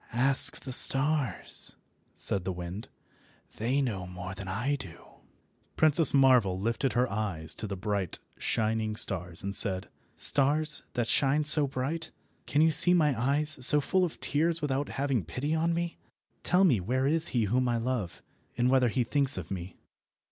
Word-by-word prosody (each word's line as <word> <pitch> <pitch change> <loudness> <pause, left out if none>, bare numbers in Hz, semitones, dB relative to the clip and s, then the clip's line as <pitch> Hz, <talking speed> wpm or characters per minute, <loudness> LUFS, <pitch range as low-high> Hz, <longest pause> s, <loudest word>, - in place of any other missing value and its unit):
"Ask 135 +4 +2
the 130 - -8
stars," 140 +2 -2 0.4
said 95 - -4
the 95 - -4
wind. 90 +4 -8 0.7
"They 125 +6 -1
know 100 -8 -5
more 90 +1 -8
than 95 0 -10
I 115 +10 -2
do." 95 -11 -9 0.8
Princess 155 0 +6
Marvel 125 -9 +2
lifted 115 +6 -2
up - - -14
her 125 -1 0
eyes 95 -7 -3
to 110 - -6
the 100 -1 -6
bright, 100 -2 -4 0.2
shining 110 -1 -2
stars, 90 -5 +1
and 100 0 -4
said— 95 -4 +6 0.3
"Stars, 150 +2 +3
that 120 -2 -2
shine 140 +4 +1
so 150 -1 +4
bright, 140 +5 -5 0.4
can 150 +2 +1
you 160 - +3
see 175 +4 +6
my 150 -5 +1
eyes 140 +3 0
so 150 +4 +7
full 185 +6 -1
of 175 - -5
tears 165 +3 -1
without 145 -1 -3
having 135 -6 -3
pity 125 - -5
on 165 +1 -1
me? 170 0 -4 0.4
Tell 180 +2 +1
me 140 - +2
where 130 +8 -2
is 160 +3 +2
he 120 -4 -1
whom 125 +4 -1
I 120 - -1
love, 115 -6 -5 0.3
and 125 +1 +1
whether 130 -2 +2
he 125 +3 -1
thinks 140 +3 +1
of 90 -1 -8
me." 90 -1 -8
130 Hz, 170 wpm, -27 LUFS, 100-145 Hz, 0.8 s, so